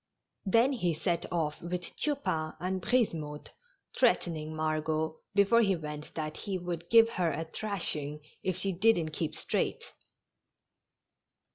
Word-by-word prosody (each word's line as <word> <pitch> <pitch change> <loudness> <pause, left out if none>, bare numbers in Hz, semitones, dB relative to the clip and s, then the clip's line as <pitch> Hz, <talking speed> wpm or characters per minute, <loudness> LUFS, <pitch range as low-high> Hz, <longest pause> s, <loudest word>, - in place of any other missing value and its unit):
Then 230 +7 +5
he 180 -10 0
set 170 +1 -1
off 155 -4 -1
with 175 +1 -4
Tupain 270 - 0
and 185 +1 -2
Brisemotte, 165 -11 0 0.4
threatening 155 -2 +1
Margot 155 0 -1 0.2
before 205 +4 +5
he 195 -4 +3
went 150 -2 -7
that 155 -1 -3
he 195 -2 -3
would 175 -1 -5
give 230 0 +8
her 180 -7 0
a 160 +3 -2
thrashing 160 -6 -3 0.2
if 185 -1 -1
she 195 +1 -1
didn't 185 -3 +3
keep 155 0 -2
straight. - - -2
170 Hz, 130 wpm, -31 LUFS, 155-195 Hz, 0.4 s, give